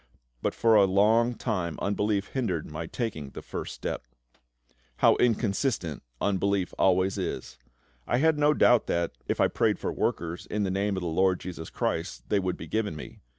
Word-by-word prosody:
But - - -1
for 115 -1 +4
a 105 -2 +7
long 110 +5 +3
time 90 - -2
unbelief 100 0 0
hindered 95 - -1
my 80 +2 -6
taking 85 - -4
the - - -9
first - - -5
step. 60 - -5 0.9
How - - +5
inconsistent 110 - 0 0.2
unbelief 100 -1 0
always 95 0 +3
is! 65 -1 -4 0.5
I 120 - +2
had 160 +2 +3
no 150 +1 +4
doubt 120 -3 +4
that, 85 -1 0 0.2
if - - -1
I - - +5
prayed - - +1
for - - -3
workers, 85 +1 -2
"in 105 0 -1
the 95 - 0
Name" 100 +1 0
of - - -2
the 90 - -3
LORD 90 +2 +2
JESUS 85 -3 -7
CHRIST, 80 +3 -3
they 105 - +3
would 95 -1 -2
be - - -7
given 110 -6 -1
me. 75 - -9
100 Hz, 180 wpm, -28 LUFS, 85-110 Hz, 0.9 s, a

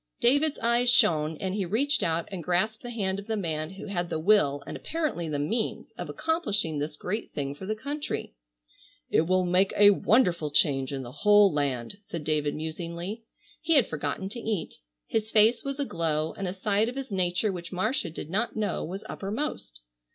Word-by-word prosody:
David's 285 +5 +3
eyes 235 +1 +2
shone 160 -11 +3
and 190 +2 -3
he 200 -1 0
reached 260 - +1
out 165 0 0
and 185 -4 -5
grasped 185 +7 0
the 245 - -7
hand 195 -5 -1
of 200 - -10
the 220 -1 -1
man 155 -5 -2
who 190 +2 -9
had 175 -3 -2
the - - -1
will 155 -6 +3
and - - -6
apparently 300 - -2
the 150 - -1
means 215 +11 -2
of - - -7
accomplishing 210 - 0
this 150 +1 -3
great 210 +8 -4
thing 140 -1 -3
for 185 +6 -9
the 215 - -1
country. 285 - -4 0.8
"It 160 - +3
will 185 0 +3
make 185 +2 +3
a 205 0 +8
wonderful 185 -7 +2
change 140 -2 +2
in 135 -1 -4
the 120 - -8
whole 205 +6 +5
land," 140 +4 -2
said 165 -3 -5
David 150 -1 0
musingly. 170 +7 -5 0.4
He 330 0 +2
had 275 - +6
forgotten 150 +5 -3
to 235 - -5
eat. 220 -6 -3 0.3
His 220 -1 -1
face 220 +2 +4
was 275 0 -4
aglow 160 - 0
and 195 - -4
a 180 - -3
side 205 +3 +1
of 250 - -7
his 270 -3 -5
nature 185 +2 +1
which 170 -2 -7
Marcia 200 - -1
did 160 0 -8
not 220 +5 0
know 215 -2 -1
was 190 +5 -6
uppermost. 195 - -4
190 Hz, 195 wpm, -27 LUFS, 160-220 Hz, 0.8 s, a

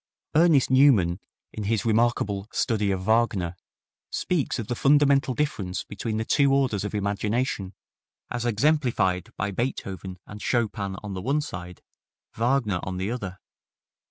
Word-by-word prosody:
Ernest 155 -5 +4
Newman, 115 -11 +5 0.3
in 105 - -5
his 110 +1 0
remarkable 110 -3 +1
"Study 105 -4 0
of 95 -1 -1
Wagner," 100 -5 +1 0.5
speaks 170 -6 -1
of 115 - -3
the 120 - -2
fundamental 140 0 +3
difference 105 -11 -2
between 110 +2 -4
the 110 - -2
two 140 +3 +3
orders 130 -8 +1
of 105 +1 -4
imagination, 105 0 -1 0.6
as 125 -1 -2
exemplified 120 -6 +1
by 100 +1 -1
Beethoven 95 -5 -4
and 105 0 -10
Chopin 105 -5 -1
on 105 -2 -5
the 95 - -4
one 140 +8 +1
side, 90 - -7 0.5
Wagner 115 -5 +1
on 95 0 -4
the 95 +4 -2
other. 100 -7 -5
110 Hz, 140 wpm, -26 LUFS, 95-130 Hz, 0.6 s, Newman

